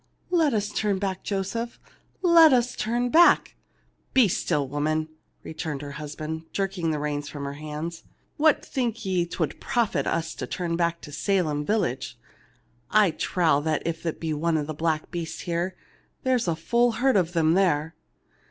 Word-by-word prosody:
Let 320 -8 +3
us 210 -1 0
turn 210 -2 0
back, 190 -1 -3
Joseph, 210 +4 -3 0.4
let 335 -4 +7
us 245 -1 +2
turn 240 +3 0
back 340 +6 +5 0.3
!" - - -42
"Be 255 -5 +7
still, 145 -5 0
woman 155 +3 -1 0.2
!" - - -44
returned 155 -2 -5
her 145 - -6
husband, 155 +2 -6
jerk 195 -1 -2
ing 165 -1 0
the 155 - 0
reins 145 -1 -3
from 140 -1 -6
her 140 - -4
hand. 155 +3 -6 0.2
" - - -41 0.2
What 310 0 +3
think 235 -4 -2
ye 180 -2 +1
'twould 165 -2 -3
profit 240 -5 0
us 165 0 -1
to - - -6
turn 175 -2 -2
back 170 0 0
to 150 - -10
Salem 155 -3 0
village? 145 - -1 0.7
I 210 -4 +4
trow 160 -4 +1
if 160 +1 -1
there 165 -2 -2
be 160 -1 -3
one 155 0 0
black 155 +1 -2
beast 165 -2 -5
here, 175 +1 -2 0.5
there 260 0 +3
is 235 - -1
a 165 - +1
full 235 +8 +2
herd 260 +3 +2
of 175 -3 +2
them 160 -1 +3
there. 165 -4 +2
170 Hz, 175 wpm, -26 LUFS, 155-215 Hz, 0.7 s, let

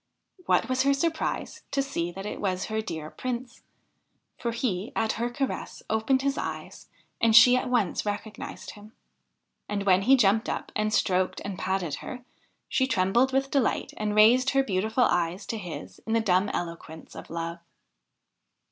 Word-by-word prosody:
\Vhat - - +3
was 255 0 +1
her 275 +1 +3
surprise 320 +2 -2
to 275 - 0
see 175 -11 -3
that 195 +3 -8
it - - -5
was 185 -2 -1
her 220 - +1
dear 160 -7 -6
Prince! 250 -1 -5 0.7
for 235 - -3
he, 225 -4 -2
at 225 -1 +1
her 235 +1 -2
caress, 265 +2 -4
opened 240 +5 +2
his 275 0 0
eyes, - - -6 0.3
and 225 -1 +4
she 245 +2 +9
at 255 - -1
once 240 -7 +1
recognised 210 +1 -5
him. 210 +1 -14 0.8
And 205 -1 -1
when 190 -1 +4
he 265 +7 +5
jumped 220 -1 +3
up - - -4
and 215 0 0
stroked 185 -3 +1
and 200 -2 -5
patted 190 -5 -1
her, 250 -1 -8 0.4
she 260 0 +1
trembled 235 +3 +2
with 270 +1 0
delight 275 -5 0
and 210 -1 -2
raised 240 +5 +6
her 270 0 +3
beautiful 220 +3 +1
eyes 175 -2 0
to 225 - -4
his 125 - -8
in 225 - 0
the 230 - +4
dumb 195 -2 +2
eloquence 165 -2 -6
of - - -9
love. 170 +1 -4
220 Hz, 170 wpm, -27 LUFS, 185-255 Hz, 0.8 s, she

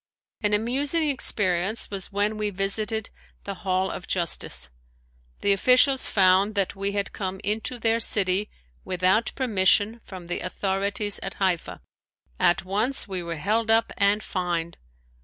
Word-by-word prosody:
An 210 -1 +1
amusing 280 +9 0
experience 200 -6 0
was 195 -1 -4
when 205 +2 0
we 210 -1 -1
visited 210 +3 -2 0.3
the 200 - -5
Hall 190 0 -1
of 180 - -7
Justice. 170 - 0 0.7
The 200 - +4
officials 255 +6 +4
found 195 +2 +3
that 195 -1 0
we 200 +1 -2
had 200 -1 -2
come 190 -1 -4
into 220 +4 -1
their 225 0 +1
city 200 -2 +2 0.3
without 185 +5 +2
permission 215 -1 +2
from 185 -3 -10
the 175 - -3
authorities 200 +2 -2
at 195 - -6
Haifa. 185 -4 -2 0.6
At 175 +1 +2
once 215 +8 -1
we 190 -2 -3
were 170 -1 -4
held 215 +8 0
up 225 +1 +3
and 205 +1 +2
fined. 175 -3 -3
200 Hz, 140 wpm, -25 LUFS, 185-220 Hz, 0.7 s, The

